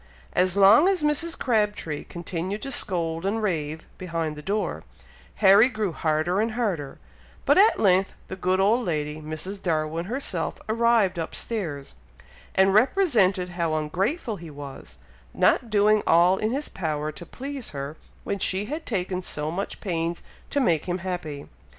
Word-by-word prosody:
As 185 +1 +2
long 205 - +7
as 380 -5 +1
Mrs. 315 +3 +1
Crabtree 210 - -1
continued 175 +4 -5
to 275 - -4
scold 165 -7 -1
and 200 +3 0
rave 160 -7 -2
behind 165 -4 -3
the 150 - -8
door, 205 +6 -2 0.5
Harry 205 +4 +6
grew 215 -6 -2
harder 160 +5 0
and 225 0 -1
harder; 190 - -2 0.5
but - - +5
at 425 +3 +5
length 190 -1 +3
the - - -6
good 185 0 0
old 220 +6 +3
lady, 150 -4 -2
Mrs. 155 +6 -4
Darwin 160 0 -1
herself, 205 -7 -2
arrived 225 -5 +2
up 165 - -4
stairs, 165 -12 -4 0.6
and 190 0 +4
represented 215 - +3
how 170 -3 -1
ungrateful 195 - -1
he 170 -2 -10
was, 140 -2 -10 0.4
not 235 - +3
doing 210 0 +4
all 175 +3 +5
in 215 - 0
his 280 +5 -2
power 155 -4 -3
to 170 - -9
please 270 - -6
her, 140 +1 -6 0.3
when 200 - -3
she 190 +2 +1
had 305 +7 -6
taken 185 -4 -2
so 150 -3 -4
much 195 +4 -5
pains 170 -2 -2 0.3
to 285 - 0
make 170 - +2
him 180 0 -1
happy. 175 -6 -5
185 Hz, 155 wpm, -25 LUFS, 165-215 Hz, 0.6 s, long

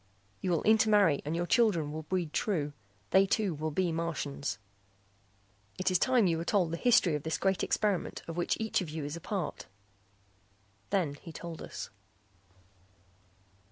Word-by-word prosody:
You 185 - -1
will 170 -3 +1
intermarry 210 -8 +4
and 155 +3 -2
your 175 +1 0
children 175 -9 +2
will 155 +1 -4
breed 170 -1 -2
true. 150 -9 0 0.4
They 195 +1 +5
too 200 -2 +1
will 155 +1 -3
be 175 +3 0
Martians. 160 -6 -3 1.2
"It 185 0 +1
is 180 - +3
time 255 -4 +4
you 165 -3 +1
were - - -2
told 180 -3 +1
the 170 - -2
history 210 -6 +4
of 150 - -1
this 160 +2 -2
great 195 0 +1
experiment 205 -4 0
of 165 - -5
which 175 - 0
each 220 -2 0
of 175 - -5
you 155 -1 -4
is 145 +2 -4
a 170 - -8
part." 190 -4 -4 1.2
Then 180 -8 +1
he 165 - -9
told 165 0 -7
us. - - -7
170 Hz, 165 wpm, -31 LUFS, 155-195 Hz, 1.2 s, They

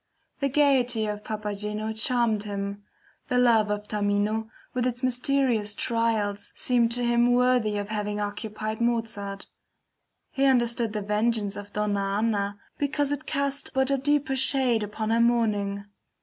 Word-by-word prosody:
The 275 -1 +1
gayety 255 -5 +3
of 210 0 -3
Papageno 210 0 -3
charmed 225 -1 +1
him; 200 -1 -4 0.5
the 250 - 0
love 230 -4 +4
of 210 0 -2
Tamino 210 +2 0 0.2
with 250 0 0
its 245 +1 -4
mysterious 250 -4 +1
trials 220 -4 -1
seemed 240 -2 +2
to 245 0 +1
him 240 0 +3
worthy 245 -4 +2
of 205 0 -4
having 210 -1 -2
occupied 215 +1 -4
Mozart; 225 -4 -1 0.9
he 275 0 +1
understood 235 -4 +2
the 210 -1 -2
vengeance 210 0 0
of 205 0 -8
Donna 200 -2 -1
Anna 205 -2 0 0.2
because 290 0 0
it 290 +2 -3
cast 280 -1 -2
but 265 +1 +2
a 275 - +3
deeper 290 0 +1
shade 260 -3 +2
upon 215 +1 -3
her 230 +1 +3
mourning. 210 -4 +1
225 Hz, 145 wpm, -26 LUFS, 210-250 Hz, 0.9 s, love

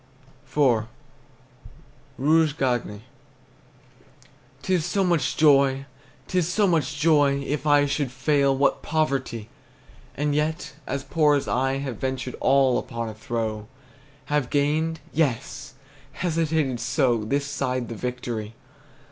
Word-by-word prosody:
IV. 125 -5 +2 1.3
ROUGE 155 +2 +3
GAGNE. 120 -6 -1 1.6
'T 190 - 0
is 175 -4 +2
so 195 +4 0
much 165 -8 +1
joy! 140 -3 +4 0.4
'T 185 - +1
is 170 -1 0
so 210 +3 +2
much 150 -6 0
joy! 145 -3 +4
If 150 +1 -2
I 145 -1 +5
should 140 -2 -1
fail, 135 0 +2
what 140 +1 +2
poverty! 135 -8 -1 0.7
And 145 +1 0
yet, 155 +1 -1
as 140 +1 -3
poor 150 -1 +3
as 140 - -1
I 135 +2 +1
Have 135 -4 -4
ventured 130 0 -3
all 135 -1 +3
upon 115 -2 -5
a - - -7
throw; 110 -1 -4 0.6
Have 145 -4 0
gained! 155 +3 0
Yes! 135 -6 -2 0.4
Hesitated 160 -5 0
so 120 -1 +1
This 140 +6 -1
side 130 -4 -2
the - - -6
victory! 115 -2 -5
140 Hz, 125 wpm, -24 LUFS, 125-150 Hz, 1.6 s, I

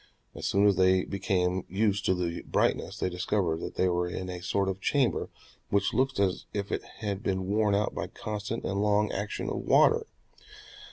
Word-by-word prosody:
As - - -4
soon 100 +2 +3
as 100 -3 +4
they 95 0 +4
became 95 -2 0
used 100 0 +1
to 95 - +3
the 85 -1 -2
brightness - - 0
they - - 0
discovered 90 -2 0
that - - -6
they 95 - +2
were 90 0 +1
in 90 +1 -4
a 90 -1 -6
sort 95 +2 0
of 95 0 -3
chamber 140 +1 +1 0.4
which 100 0 +1
looked 130 0 +1
as 95 -2 0
if 100 -1 -3
it - - -1 0.2
had 100 -2 -2
been 95 -2 -1
worn 105 +1 +2
out 105 +1 0
by - - -3
constant 105 +1 -5
and 100 +1 -1
long 105 0 +2
action 100 +2 -3
of - - -2
water. - - +4
100 Hz, 190 wpm, -29 LUFS, 95-105 Hz, 0.4 s, as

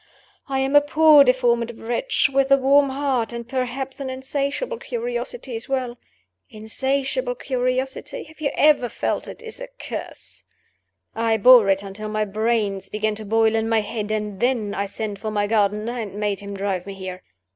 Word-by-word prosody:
I 270 - 0
am 270 +2 0
a 290 - +9
poor 300 0 +6
deformed 235 -3 +1
wretch, 240 - 0
with 275 -1 +1
a 275 - +8
warm 275 +1 +4
heart, 265 -4 -1
and, 235 -1 -6
perhaps, 260 +1 -3
an 270 -1 -4
insatiable 280 - -3
curiosity 485 - -4
as 225 +3 -6
well. 255 -3 -2 0.5
Insatiable 270 - -2
curiosity 255 - -2
(have 315 0 -17
you 285 - +1
ever 295 -5 +4
felt - - -2
it?) - - -10
is 455 +1 -7
a - - -5
curse. - - -7 0.7
I 225 0 +1
bore 235 -1 +7
it 195 +1 +2
until 205 +2 -6
my 215 0 0
brains 210 -2 -1
began 215 0 -1
to 215 0 -4
boil 225 +1 +3
in 225 0 0
my 225 -1 +3
head; 210 0 -4
and 210 -2 -3
then 235 -4 0
I 200 0 -2
sent 205 0 -5
for 215 - -4
my 205 -1 0
gardener, 210 +2 0
and 205 -3 -5
made 205 -2 -1
him 200 0 -7
drive 195 -2 -2
me 195 - -6
here. 185 -1 -7
235 Hz, 180 wpm, -22 LUFS, 210-270 Hz, 0.7 s, a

